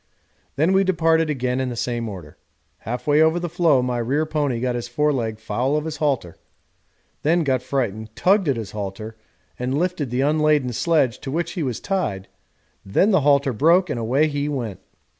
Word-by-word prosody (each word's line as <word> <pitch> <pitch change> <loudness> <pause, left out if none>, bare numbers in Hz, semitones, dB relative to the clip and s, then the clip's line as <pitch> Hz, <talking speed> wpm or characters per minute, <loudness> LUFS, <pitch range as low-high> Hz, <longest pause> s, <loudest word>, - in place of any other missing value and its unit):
Then 160 +6 +2
we 195 +1 +4
departed 165 -3 +2
again 130 -3 -1
in 130 -1 -1
the 120 - -5
same 120 -1 -2
order. 85 -7 -9 0.4
Half 125 +3 -5
way 150 +1 +4
over 160 +2 +3
the 175 - -3
floe 165 -6 +2
my 125 -1 -1
rear 135 +7 0
pony 145 -6 -1
got 125 0 -1
his 120 0 -4
foreleg 120 -4 0
foul 125 +7 -1
of 150 - -3
his 160 -2 -4
halter, 135 - -1 0.8
then 165 +3 +2
got 130 -4 +1
frightened, 110 -5 -3
tugged 190 -3 +3
at 135 - +2
his 110 -4 -6
halter, 105 +2 -6 0.4
and 125 +3 -1
lifted 175 -5 -1
the 125 +2 -1
unladen 150 -3 +2
sledge 140 -2 +1
to 135 - -7
which 170 +4 -2
he 175 - -4
was 125 -6 -2
tied 165 - -2 0.6
then 145 - +2
the 190 - +4
halter 140 -1 +3
broke 170 - +3
and 120 - -2
away 130 +7 +2
he 145 -1 -2
went. 115 -9 -4
140 Hz, 190 wpm, -22 LUFS, 120-155 Hz, 0.8 s, we